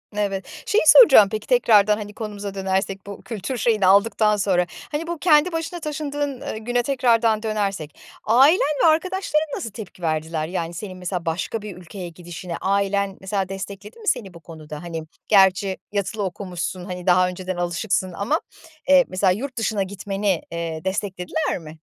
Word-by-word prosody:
Evet. 195 Hz, -2 st, -3 dB
Şeyi 435 Hz, -, +2 dB
soracağım 270 Hz, -, +9 dB
peki, 215 Hz, -1 st, -5 dB
tekrardan 215 Hz, -4 st, +4 dB
hani 210 Hz, -1 st, -7 dB
konumuza 205 Hz, -2 st, -6 dB
dönersek, 195 Hz, 0 st, -2 dB
bu 200 Hz, -, -8 dB
kültür 225 Hz, +3 st, -5 dB
şeyini 215 Hz, -3 st, +2 dB
aldıktan 210 Hz, +2 st, +4 dB
sonra, 185 Hz, -3 st, +2 dB, 0.3 s
hani, 315 Hz, +3 st, -3 dB
bu 340 Hz, -1 st, -3 dB
kendi 310 Hz, +1 st, +4 dB
başına 330 Hz, +1 st, -4 dB
taşındığın, 290 Hz, -3 st, -3 dB
ııı, -, -, -5 dB
güne 245 Hz, +2 st, -1 dB
tekrardan 235 Hz, -4 st, +2 dB
dönersek 200 Hz, -8 st, -3 dB, 0.3 s
ailen 270 Hz, -, +6 dB, 0.2 s
ve -, -, +7 dB
arkadaşların 320 Hz, -1 st, +1 dB
nasıl 230 Hz, -, -5 dB
tepki 200 Hz, -4 st, -10 dB
verdiler? 155 Hz, -1 st, -2 dB
Yani 170 Hz, -1 st, -3 dB
senin 185 Hz, +1 st, -7 dB
mesela 180 Hz, -1 st, -4 dB
başka 175 Hz, +7 st, -2 dB
bir 205 Hz, -4 st, -8 dB
ülkeye 180 Hz, 0 st, -8 dB
gidişine 175 Hz, 0 st, -7 dB
ailen, 200 Hz, 0 st, 0 dB
mesela, 190 Hz, -1 st, -2 dB
destekledi 200 Hz, -, -8 dB
mi 430 Hz, -, -11 dB
seni 195 Hz, -6 st, 0 dB
bu 170 Hz, -, -12 dB
konuda? 155 Hz, -2 st, -10 dB
Hani 165 Hz, -2 st, -5 dB, 0.2 s
gerçi 190 Hz, -1 st, +4 dB
yatılı 200 Hz, +1 st, -2 dB
okumuşsun, 185 Hz, -1 st, -4 dB
hani, 180 Hz, 0 st, -7 dB
daha 180 Hz, 0 st, +5 dB
önceden 185 Hz, 0 st, -5 dB
alışıksın 180 Hz, +1 st, -1 dB
ama, 220 Hz, -, 0 dB, 0.5 s
eee, 275 Hz, -2 st, +7 dB
mesela 185 Hz, 0 st, +2 dB
yurt 255 Hz, +6 st, -4 dB
dışına 215 Hz, -3 st, 0 dB
gitmeni, 195 Hz, -1 st, -2 dB
eee, 165 Hz, -2 st, -4 dB
desteklediler 190 Hz, -, -2 dB
mi? 160 Hz, -1 st, -11 dB
200 Hz, 160 wpm, -22 LUFS, 180-230 Hz, 0.5 s, soracağım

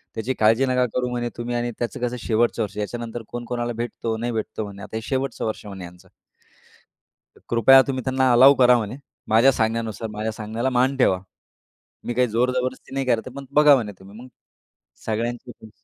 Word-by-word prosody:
त्याची 115 Hz, +4 st, -2 dB
काळजी 115 Hz, +5 st, +4 dB
नका 125 Hz, -1 st, +2 dB
करू 125 Hz, 0 st, 0 dB
म्हणे 120 Hz, -1 st, -2 dB
तुम्ही 120 Hz, +1 st, -3 dB
आणि 120 Hz, 0 st, -1 dB
त्याचं 120 Hz, 0 st, -3 dB
कसं 125 Hz, 0 st, -2 dB
शेवटचं 115 Hz, +1 st, +1 dB
वर्ष. 105 Hz, 0 st, -7 dB
याच्यानंतर 115 Hz, +2 st, -4 dB
कोण 120 Hz, 0 st, -6 dB
कोणाला 120 Hz, 0 st, -3 dB
भेटतो, 115 Hz, -1 st, -4 dB
नाही 120 Hz, +2 st, -3 dB
भेटतो 110 Hz, -1 st, -4 dB
म्हणे. 100 Hz, 0 st, -10 dB
आता -, -, -9 dB
हे -, -, -4 dB
शेवटचं 135 Hz, -3 st, -2 dB
वर्ष 110 Hz, -1 st, -4 dB
म्हणे 95 Hz, -3 st, -8 dB
यांचं. 90 Hz, 0 st, -15 dB, 1.3 s
तर -, -, -20 dB
कृपया 130 Hz, +3 st, +7 dB
तुम्ही 130 Hz, -1 st, -2 dB
त्यांना 130 Hz, -1 st, +2 dB
अलाऊ 130 Hz, +4 st, +8 dB
करा 125 Hz, -1 st, +5 dB
म्हणे. 115 Hz, +3 st, -4 dB, 0.3 s
माझ्या 115 Hz, +5 st, +5 dB
सांगण्यानुसार, 115 Hz, -2 st, -2 dB
माझ्या 110 Hz, +1 st, -3 dB
सांगण्याला 110 Hz, +4 st, -3 dB
मान 130 Hz, +2 st, +2 dB
ठेवा. 95 Hz, -8 st, +3 dB, 0.8 s
मी 120 Hz, -, -3 dB
काही 125 Hz, +1 st, +2 dB
जोर 120 Hz, +3 st, +1 dB
जबरदस्ती 130 Hz, +1 st, -5 dB
नाही 135 Hz, -1 st, -1 dB
करत, 120 Hz, 0 st, 0 dB
पण 140 Hz, 0 st, -7 dB
बघा 150 Hz, -1 st, +6 dB
म्हणे 110 Hz, -5 st, -2 dB
तुम्ही 100 Hz, +3 st, -14 dB
मग 130 Hz, -, -11 dB, 0.8 s
सगळ्यांचीच 115 Hz, 0 st, -4 dB
120 Hz, 185 wpm, -23 LUFS, 110-125 Hz, 1.3 s, अलाऊ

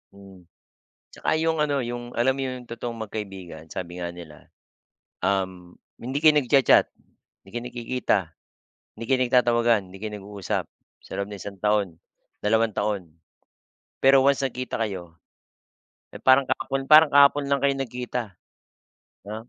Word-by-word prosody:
Mm. 95 Hz, -3 st, -15 dB, 0.6 s
Tsaka -, -, -1 dB
'yong 160 Hz, 0 st, +1 dB
ano 145 Hz, -2 st, +1 dB
'yong 120 Hz, 0 st, -6 dB
alam 125 Hz, +3 st, +2 dB
mo -, -, -3 dB
yung 130 Hz, -1 st, -5 dB
totoong 115 Hz, 0 st, -5 dB
magkaibigan. 95 Hz, -7 st, -7 dB
Sabi 85 Hz, +1 st, -7 dB
nga 85 Hz, 0 st, -4 dB
nila, 80 Hz, -4 st, -13 dB, 0.8 s
um, 95 Hz, -2 st, -2 dB, 0.2 s
hindi 130 Hz, +4 st, -3 dB
kayo 155 Hz, 0 st, +6 dB
nagcha-chat, 135 Hz, 0 st, +4 dB, 0.6 s
hindi 95 Hz, -, -16 dB
kayo 120 Hz, +1 st, -4 dB
nagkikita, 120 Hz, -2 st, 0 dB, 0.8 s
hindi 115 Hz, -, -5 dB
kayo 130 Hz, -, +3 dB
nagtatawagan, 120 Hz, -3 st, +3 dB
hindi 95 Hz, +1 st, -12 dB
kayo 110 Hz, -1 st, -4 dB
nag-uusap 100 Hz, -1 st, -4 dB, 0.4 s
sa -, -, -15 dB
loob 100 Hz, +1 st, -3 dB
ng 100 Hz, -2 st, -8 dB
isang 100 Hz, +1 st, -8 dB
taon, 105 Hz, -5 st, +1 dB, 0.5 s
dalawang 110 Hz, 0 st, +2 dB
taon. 105 Hz, -2 st, -1 dB, 1.0 s
Pero 135 Hz, 0 st, +6 dB
once 140 Hz, 0 st, +2 dB
nagkita 130 Hz, -1 st, -3 dB
kayo, 90 Hz, -5 st, -8 dB, 1.0 s
eh, -, -, -10 dB
parang 130 Hz, +1 st, +5 dB
kahapon 135 Hz, 0 st, -2 dB
parang 155 Hz, 0 st, +8 dB
kahapon 145 Hz, 0 st, +5 dB
lang 140 Hz, -1 st, +2 dB
kayo 140 Hz, 0 st, +2 dB
nagkita, 125 Hz, -2 st, -3 dB, 1.0 s
'no? 110 Hz, +3 st, -8 dB
115 Hz, 140 wpm, -25 LUFS, 100-130 Hz, 1.0 s, parang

